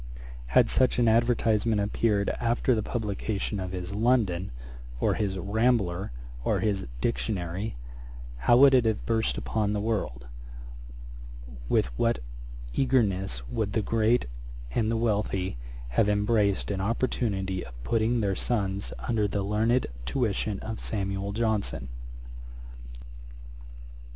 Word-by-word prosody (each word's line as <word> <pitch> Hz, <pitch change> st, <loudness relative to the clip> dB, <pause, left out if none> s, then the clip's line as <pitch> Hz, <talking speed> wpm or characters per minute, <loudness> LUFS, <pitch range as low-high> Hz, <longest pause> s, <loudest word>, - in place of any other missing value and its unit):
Had -, -, +7 dB
such 95 Hz, -, +2 dB
an 120 Hz, -1 st, +3 dB
advertisement 115 Hz, -1 st, +3 dB
appeared 100 Hz, 0 st, +1 dB
after 120 Hz, +2 st, +2 dB
the 110 Hz, -, +1 dB
publication 105 Hz, -2 st, -2 dB
of 90 Hz, -1 st, -4 dB
his 90 Hz, +1 st, -5 dB
London, 105 Hz, -5 st, +2 dB, 0.5 s
or -, -, +2 dB
his 100 Hz, -3 st, -1 dB
Rambler, 100 Hz, -2 st, +1 dB, 0.3 s
or -, -, +1 dB
his 100 Hz, -8 st, -1 dB
Dictionary, 100 Hz, -3 st, -2 dB, 0.6 s
how 120 Hz, -, +4 dB
would 135 Hz, +1 st, +8 dB
it 125 Hz, -3 st, +5 dB
have 110 Hz, -2 st, 0 dB
burst 115 Hz, -1 st, +1 dB
upon 105 Hz, -2 st, -1 dB
the 105 Hz, -, 0 dB
world! 100 Hz, -, -2 dB, 1.4 s
with -, -, +3 dB
what 115 Hz, 0 st, +2 dB, 0.6 s
eagerness 95 Hz, -, +1 dB
would 105 Hz, -, -2 dB
the 110 Hz, -, +1 dB
great 115 Hz, +3 st, +2 dB, 0.5 s
and 110 Hz, -, +1 dB
the 115 Hz, -, +1 dB
wealthy 100 Hz, -, 0 dB, 0.3 s
have -, -, +2 dB
embraced 105 Hz, -1 st, +2 dB
an 95 Hz, -1 st, -2 dB
opportunity 95 Hz, -4 st, -1 dB
of -, -, -11 dB
putting 115 Hz, -, +1 dB
their 100 Hz, -2 st, +1 dB
sons 100 Hz, -4 st, -1 dB
under 110 Hz, -4 st, +2 dB
the 100 Hz, 0 st, -1 dB
learned 110 Hz, +5 st, +2 dB, 0.2 s
tuition 105 Hz, -, 0 dB
of 110 Hz, 0 st, -5 dB
SAMUEL 100 Hz, -1 st, -2 dB
JOHNSON. 110 Hz, -, -1 dB
105 Hz, 120 wpm, -28 LUFS, 95-115 Hz, 1.4 s, would